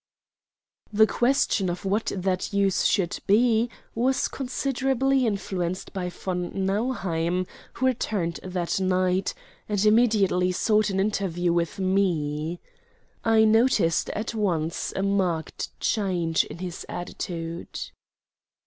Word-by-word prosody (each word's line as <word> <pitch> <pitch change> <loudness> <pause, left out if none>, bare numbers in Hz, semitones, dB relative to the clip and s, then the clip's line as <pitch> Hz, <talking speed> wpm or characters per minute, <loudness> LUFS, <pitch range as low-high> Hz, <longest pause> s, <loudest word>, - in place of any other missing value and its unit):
The 215 +1 +6
question 240 -5 +1
of 175 +2 -4
what 205 +3 0
that 185 -1 -1
use 200 -2 +2
should 185 -5 0
be 225 +2 +4 0.2
was 255 +3 +1
considerably 270 0 0
influenced 185 -3 -3
by 180 -2 -3
von 180 0 -4
Nauheim, 185 -5 0 0.3
who 260 - -1
returned 205 -9 0
that 180 -1 -2
night, 185 0 +1 0.3
and 205 0 +1
immediately 210 -5 +3
sought 215 +2 +2
an 190 -1 -1
interview 185 -4 0
with 170 -1 -1
me. 175 -4 0 0.6
I 225 -1 +5
noticed 220 -6 +3
at 220 +2 -3
once 170 -7 -1
a 190 - -1
marked 185 -5 -1
change 180 -7 +1
in - - -9
his 175 -1 -6
attitude. 170 -1 -5
190 Hz, 115 wpm, -25 LUFS, 175-220 Hz, 0.6 s, The